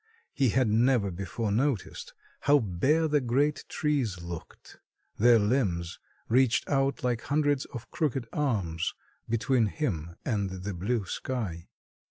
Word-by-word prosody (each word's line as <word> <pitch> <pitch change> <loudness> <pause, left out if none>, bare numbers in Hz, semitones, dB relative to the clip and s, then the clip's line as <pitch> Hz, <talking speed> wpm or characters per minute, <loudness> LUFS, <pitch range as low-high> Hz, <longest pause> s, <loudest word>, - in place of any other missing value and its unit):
He 135 -3 +2
had 130 +2 +2
never 110 -1 +3
before 100 +4 -3
noticed 120 0 -1 0.2
how 145 +1 +5
bare 135 - +1
the 150 -1 +2
great 140 +5 +1
trees 135 - 0
looked. 85 -1 -9 0.4
Their 120 +2 +7
limbs 105 -7 0 0.3
reached 125 0 +3
out 135 0 0
like 120 -2 0
hundreds 145 -1 +1
of 120 -3 -9
crooked 135 -6 -1
arms 100 - -1 0.3
between 115 +1 +2
him 85 - -3
and 100 -4 0
the 95 +2 -5
blue 100 +5 -1
sky. 95 -7 -4
120 Hz, 130 wpm, -28 LUFS, 100-135 Hz, 0.4 s, Their